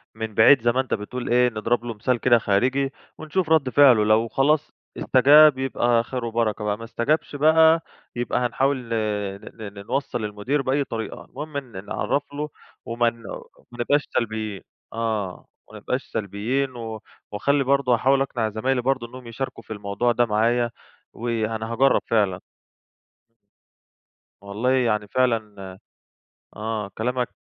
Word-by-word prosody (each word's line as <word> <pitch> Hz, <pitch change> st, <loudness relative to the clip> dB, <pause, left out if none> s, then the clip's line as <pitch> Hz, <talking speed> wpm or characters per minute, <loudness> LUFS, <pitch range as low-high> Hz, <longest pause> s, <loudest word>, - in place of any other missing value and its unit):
من 110 Hz, -1 st, -5 dB
بعيد 120 Hz, +3 st, +6 dB
زي 120 Hz, -, +3 dB
ما 130 Hz, +2 st, +1 dB
أنت 130 Hz, -, -5 dB
بتقول 120 Hz, +4 st, -4 dB
إيه، 125 Hz, +1 st, +4 dB
نضرب 115 Hz, +2 st, -1 dB
له 115 Hz, -, -4 dB
مثال 120 Hz, +4 st, 0 dB
كده 120 Hz, -1 st, +5 dB
خارجي 130 Hz, +7 st, +1 dB, 0.3 s
ونشوف 160 Hz, +2 st, -2 dB
رد 155 Hz, -5 st, +3 dB
فعلُه، 130 Hz, -6 st, +6 dB
لو 110 Hz, +2 st, +3 dB
خلاص 145 Hz, +5 st, +1 dB, 0.3 s
استجاب 145 Hz, +2 st, +6 dB
يبقى 120 Hz, -3 st, +1 dB
خير 125 Hz, 0 st, -5 dB
وبركة 115 Hz, -2 st, -1 dB
بقى، 105 Hz, 0 st, -1 dB
ما 115 Hz, -, -10 dB
استجابش 135 Hz, +6 st, -1 dB
بقى 160 Hz, +2 st, +5 dB, 0.3 s
يبقى 120 Hz, +1 st, -1 dB
هنحاول 130 Hz, +3 st, +1 dB
ن 125 Hz, -2 st, -10 dB, 0.5 s
ن 105 Hz, -2 st, -9 dB
ن 100 Hz, 0 st, -10 dB
نوصّل 135 Hz, -3 st, -2 dB
للمدير 105 Hz, +7 st, -2 dB
بأي 135 Hz, +2 st, 0 dB
طريقة، 115 Hz, -4 st, -6 dB
المهم 150 Hz, +1 st, -7 dB
إن 115 Hz, -8 st, -7 dB
نعرفله 145 Hz, +6 st, -2 dB, 0.4 s
ومان 115 Hz, 0 st, -1 dB, 0.3 s
ومانبقاش 120 Hz, +5 st, -1 dB
سلبيين، 110 Hz, -3 st, -4 dB, 0.3 s
آه، 110 Hz, -5 st, -3 dB, 0.2 s
وما -, -, -12 dB
نبقاش -, -, -2 dB
سلبيين 115 Hz, +7 st, -2 dB
و 110 Hz, -2 st, -6 dB, 0.3 s
واخلّي 140 Hz, +7 st, +1 dB
برضه 135 Hz, -1 st, +2 dB
هاحاول 135 Hz, +3 st, +3 dB
أقنع 120 Hz, -5 st, -1 dB
زمايلي 125 Hz, +4 st, -1 dB
برضه 130 Hz, -1 st, -1 dB
إن 125 Hz, -, -14 dB
هم 130 Hz, -2 st, -10 dB
يشاركوا 115 Hz, 0 st, -6 dB
في 110 Hz, -, -7 dB
الموضوع 100 Hz, +4 st, -1 dB
ده 120 Hz, 0 st, +2 dB
معايا، 120 Hz, +2 st, +1 dB, 0.4 s
وأنا 115 Hz, -1 st, -3 dB
هاجرّب 135 Hz, +3 st, +3 dB
فعلًا. 100 Hz, -5 st, +1 dB, 2.0 s
والله 105 Hz, +5 st, -1 dB
يعني 115 Hz, -5 st, +1 dB
فعلًا 105 Hz, -6 st, -1 dB, 0.8 s
آه 110 Hz, -1 st, -3 dB
كلامك 125 Hz, +2 st, -1 dB
120 Hz, 145 wpm, -23 LUFS, 110-135 Hz, 2.0 s, بعيد